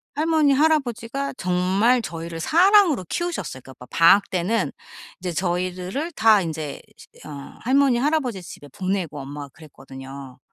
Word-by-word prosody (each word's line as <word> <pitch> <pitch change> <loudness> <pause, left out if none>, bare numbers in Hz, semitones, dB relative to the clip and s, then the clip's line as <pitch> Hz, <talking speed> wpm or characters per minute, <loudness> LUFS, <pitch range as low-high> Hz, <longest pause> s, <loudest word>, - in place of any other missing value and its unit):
할머니, 310 -2 +3
할아버지가 275 -3 0
정말 190 +7 +2
저희를 165 -3 -6
사랑으로 345 - +4
키우셨어요. 345 - -3
그러니까 130 - -13
뭐 125 - -10
바 - - -7
방학 195 +4 +6
때는 190 +4 0 0.5
이제 180 -1 -4
저희들을 185 - -2
다 220 -5 +5
인제 155 -4 -5 0.4
어 - - -9 0.3
할머니, 260 -1 +3
할아버지 270 -8 0
집에 145 -4 -11
보내고 185 -2 -3
엄마가 140 +1 -8
그랬거든요. 135 -3 -11
190 Hz, 355 characters per minute, -23 LUFS, 165-275 Hz, 0.5 s, 방학